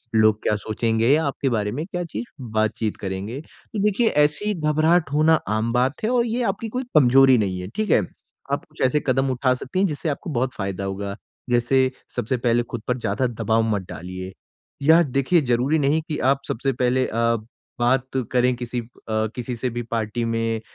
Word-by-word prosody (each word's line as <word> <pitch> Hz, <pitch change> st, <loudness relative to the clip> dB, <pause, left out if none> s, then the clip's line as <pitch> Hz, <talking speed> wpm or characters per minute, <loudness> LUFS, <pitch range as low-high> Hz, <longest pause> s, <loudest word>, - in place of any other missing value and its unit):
लोग 110 Hz, -1 st, +4 dB
क्या 105 Hz, -, +2 dB
सोचेंगे 115 Hz, +2 st, 0 dB
या 160 Hz, +2 st, +2 dB
आपके 140 Hz, -1 st, -1 dB
बारे 105 Hz, -3 st, 0 dB
में 150 Hz, +7 st, -3 dB
क्या 180 Hz, -2 st, -4 dB
चीज़ 120 Hz, -9 st, -5 dB, 0.3 s
बातचीत 110 Hz, 0 st, 0 dB
करेंगे। 100 Hz, +6 st, -4 dB
तो 205 Hz, +5 st, -10 dB
देखिए 210 Hz, +3 st, +2 dB, 0.2 s
ऐसी 205 Hz, +9 st, 0 dB
घबराहट 155 Hz, -1 st, +2 dB
होना 155 Hz, +2 st, +5 dB
आम 110 Hz, +2 st, 0 dB
बात 130 Hz, +7 st, 0 dB
है 220 Hz, -, +1 dB
और 245 Hz, -1 st, +2 dB
ये 240 Hz, +1 st, -1 dB
आपकी 210 Hz, +2 st, -2 dB
कोई 255 Hz, +4 st, -3 dB
कमजोरी 130 Hz, -1 st, +6 dB
नहीं 95 Hz, -4 st, -1 dB
है, 90 Hz, -, -6 dB
ठीक 215 Hz, -1 st, -1 dB
है? -, -, +5 dB, 0.5 s
आप -, -, -1 dB
कुछ -, -, -13 dB
ऐसे 130 Hz, +3 st, +3 dB
कदम 135 Hz, +1 st, +2 dB
उठा 130 Hz, 0 st, +2 dB
सकती 130 Hz, +8 st, -4 dB
हैं 200 Hz, -, +4 dB
जिससे 155 Hz, +1 st, -3 dB
आपको 145 Hz, +3 st, -4 dB
बहुत 130 Hz, -1 st, -1 dB
फ़ायदा 100 Hz, -1 st, -4 dB
होगा। 100 Hz, +1 st, -4 dB, 0.3 s
जैसे 130 Hz, +2 st, +3 dB, 0.2 s
सबसे 125 Hz, +4 st, -1 dB
पहले 120 Hz, 0 st, +2 dB
खुद 120 Hz, -1 st, -6 dB
पर 125 Hz, 0 st, 0 dB
ज़्यादा 130 Hz, +2 st, 0 dB
दबाव 115 Hz, -1 st, 0 dB
मत 100 Hz, -, -2 dB
डालिए। 90 Hz, +2 st, -7 dB, 0.5 s
या 160 Hz, +4 st, +6 dB
देखिए 140 Hz, +4 st, +2 dB
ज़रूरी 125 Hz, +4 st, +1 dB
नहीं 145 Hz, +3 st, +2 dB
कि 150 Hz, -, -2 dB
आप 135 Hz, +2 st, +2 dB
सबसे 135 Hz, +4 st, -1 dB
पहले 125 Hz, +1 st, +1 dB
अ, 115 Hz, +1 st, +1 dB, 0.4 s
बात 125 Hz, +2 st, +2 dB, 0.3 s
करें 125 Hz, 0 st, +3 dB
किसी 120 Hz, 0 st, -4 dB
अ, -, -, -12 dB, 0.5 s
किसी 125 Hz, 0 st, -4 dB
से 125 Hz, +2 st, -2 dB
भी 120 Hz, +1 st, -4 dB
पार्टी 115 Hz, +1 st, -1 dB
में 115 Hz, -1 st, -1 dB
125 Hz, 195 wpm, -23 LUFS, 115-150 Hz, 0.5 s, कमजोरी